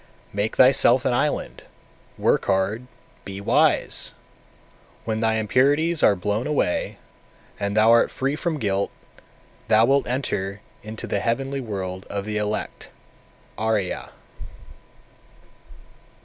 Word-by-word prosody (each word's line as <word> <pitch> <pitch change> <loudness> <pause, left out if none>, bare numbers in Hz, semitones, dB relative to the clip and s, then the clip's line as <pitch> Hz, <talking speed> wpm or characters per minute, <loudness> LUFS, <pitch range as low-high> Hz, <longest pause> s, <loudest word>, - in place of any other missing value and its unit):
236. - - -16
Make 105 +2 -1
thyself 130 -1 +5
an 125 - +2
island, 145 +4 -1 0.6
work - - +1
hard, 100 +5 0 0.4
be 100 0 -7
wise! 100 - +1 0.9
When 110 -1 -1
thy 110 0 +1
impurities 140 +9 +2
are 100 - +5
blown 105 +5 -2
away, 145 -12 -1 0.6
and 100 +1 -2
thou 110 +1 +6
art 115 0 +5
free 135 +2 -2
from 160 0 -2
guilt, 100 -6 -1 0.8
thou 110 +1 +5
wilt 140 +2 +2
enter 100 -6 -3 0.2
into 110 +1 -7
the - - -1
heavenly 135 +4 -2
world 95 -5 -5
of 100 -1 -4
the 105 0 -3
elect 105 0 -4 0.7
(Ariya). 110 -4 -1
110 Hz, 120 wpm, -23 LUFS, 100-130 Hz, 0.9 s, thou